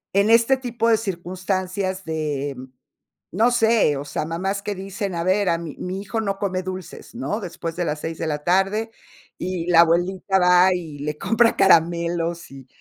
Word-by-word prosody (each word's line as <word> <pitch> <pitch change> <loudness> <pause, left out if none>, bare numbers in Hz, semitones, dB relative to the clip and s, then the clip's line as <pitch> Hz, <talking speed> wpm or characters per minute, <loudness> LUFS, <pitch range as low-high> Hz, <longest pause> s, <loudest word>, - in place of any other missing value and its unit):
en 200 +2 +3
este 230 +3 +5
tipo 235 -3 -2
de 225 - +5
circunstancias 185 0 -3
de 150 -3 -3 0.8
no 225 +7 +3
sé, 225 - +3
o 140 - -6
sea, 150 +1 -3
mamás 190 +5 -2
que 205 0 -3
dicen: 195 0 -5
"A 170 - -2
ver, 190 +2 +2
a 165 - +2
mi 165 -3 -7
mi 185 +2 -4
hijo 220 +3 -3
no 195 -2 -2
come 185 -2 -1
dulces", 185 +3 -8
¿no? 225 -3 -3
"Después 170 -3 -6
de 175 -1 -2
las 150 -1 -3
6 160 0 -5
de 165 - -2
la 150 -1 -3
tarde". 195 +6 +1 0.5
Y 180 -2 -3
la 170 -1 +8
abuelita 180 +3 +1
va 180 +1 +5
y 160 -5 -6
le 150 +1 -4
compra 230 +5 +2
caramelos, 170 -1 +2
y 135 -1 -12
185 Hz, 185 wpm, -22 LUFS, 165-200 Hz, 0.8 s, la